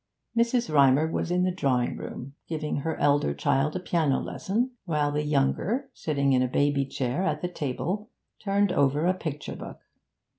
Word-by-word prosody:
Mrs. 235 -4 +1
Rymer 140 +1 +5
was - - -1
in 180 +1 +2
the 185 - +2
drawing 130 -9 0
room, 135 +2 -7
giving 155 -2 -2
her 160 +3 -2
elder 140 - +2
child 135 - +1
a - - 0
piano 160 -6 +1
lesson, 235 +7 -2
while 150 -4 +1
the 150 +1 0
younger, 155 - 0
sitting 140 -3 0
in 130 - +4
a 130 - +2
baby 140 +1 +1
chair 130 +3 -2
at 155 -4 -1
the - - +1
table, 175 +6 -3 0.3
turned 200 -1 +1
over 145 +2 +2
a 180 - +4
picture 155 -5 -5
book. - - -9
150 Hz, 175 wpm, -27 LUFS, 140-185 Hz, 0.3 s, Rymer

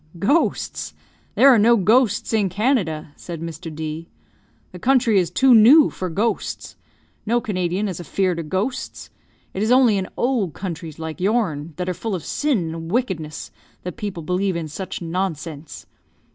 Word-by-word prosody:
"Ghosts! 280 - 0 0.4
There 275 - +7
are 240 - +5
no 235 +3 +5
ghosts 220 +2 +2
in 210 -3 +2
Canada!" 185 - 0
said 170 -2 -8
Mr. 165 +1 -7
D. 155 +1 -6 0.6
"The 180 - -10
country 240 -2 +3
is 175 -3 0
too 260 +8 +4
new 250 +8 +7
for 185 - -4
ghosts. 210 +7 -2 0.5
No 235 +3 +1
Canadian 190 -2 -2
is 185 -4 -5
afear'd 180 0 -1
of 155 -2 -6
ghosts. 210 - -3 0.4
It 190 - -3
is 220 +3 +1
only 250 -5 +5
in 185 - -4
old 235 - 0
countries, 165 -4 -6
like 160 +1 -6
your'n, 180 -8 0
that 180 +2 -4
are 185 - 0
full 195 +4 -3
of 170 - -6
sin 215 - -1
and 165 0 -7
wickedness, 190 - -3 0.3
that 180 - -5
people 200 -7 -5
believe 185 +3 -1
in 165 -2 -3
such 180 +3 -6
nonsense. 165 -3 -4
185 Hz, 160 wpm, -21 LUFS, 165-225 Hz, 0.6 s, There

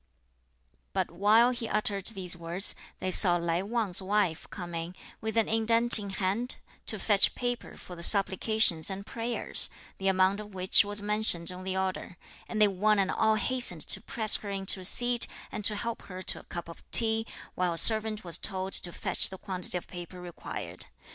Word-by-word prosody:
But - - -2
while 220 +5 +3
he 240 -2 -5
uttered 205 -2 -2
these 190 -5 -3
words, 170 +3 +3 0.3
they 185 - -3
saw 180 -1 +5
Lai 170 0 -2
Wang's 205 -3 -2
wife 190 -4 -1
coming, 175 -1 -7 0.3
with 220 0 -4
an 225 - +2
indent 230 +1 +7
in 200 -1 -6
hand, 195 +6 -2 0.3
to 215 - +1
fetch 205 -1 +2
paper 245 -1 -5
for 180 - -11
the 170 - -10
supplications 195 -2 +3
and 195 +1 -7
prayers, 235 +1 -3 0.3
the 195 - -3
amount 190 +1 +2
of 210 -2 -11
which 185 +2 +4
was 205 0 -5
mentioned 210 -5 0
on 180 +1 -10
the 190 0 -3
order; 190 -1 -4 0.3
and 215 - -5
they 210 - +5
one 205 +2 +1
and 195 -1 0
all 220 0 +1
hastened 215 -7 0
to 195 - +4
press 220 -1 +2
her 205 - -9
into 195 -1 -1
a 185 - -8
seat, 240 +4 +4 0.2
and 210 - -6
to 210 - +3
help 230 +2 -5
her 185 0 -10
to - - +1
a - - -15
cup 175 -1 -7
of 170 - -12
tea; 225 -1 +2 0.3
while 180 -1 -1
a - - -7
servant 215 +3 +3
was 170 -2 +1
told 190 -1 -4
to 175 - +2
fetch - - 0
the 190 - -9
quantity 185 -2 -4
of 175 - -9
paper 175 0 -10
required. 175 -1 -8
195 Hz, 190 wpm, -28 LUFS, 180-220 Hz, 0.3 s, indent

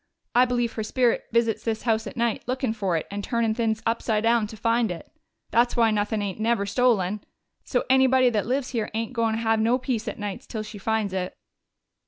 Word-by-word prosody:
I 245 +1 +6
believe 240 -2 -1
her 220 - -3
spirit 240 +2 +1
visits 230 -1 +1
this 220 -1 -2
house 225 -2 +1
at - - -8
night, 235 -1 0
lookin' 255 -2 -1
for 195 -6 0
it, 160 - -3
and 200 0 -4
turnin' 230 -1 0
things 225 -1 -1
upside 225 -1 0
down 230 -1 +3
to 220 - -10
find 230 0 +1
it. 175 -2 -7 0.4
That's 240 +2 +2
why 230 -1 +4
nuthin' 210 0 0
ain't 200 0 -4
never 220 -2 +1
stolen. 210 -3 +1 0.4
So 245 - 0
anybody 260 -1 +4
that 210 -2 -1
lives 260 +1 -1
here 225 -4 -2
ain't 225 +2 -2
goin' 230 -2 +1
have 225 -1 +1
no 230 +3 +3
peace 245 -3 -3
at 215 - -4
nights 205 -2 -5
till 215 -2 -4
she 215 -1 -9
finds 215 -1 -1
it." 185 -1 -3
225 Hz, 210 wpm, -25 LUFS, 215-240 Hz, 0.4 s, I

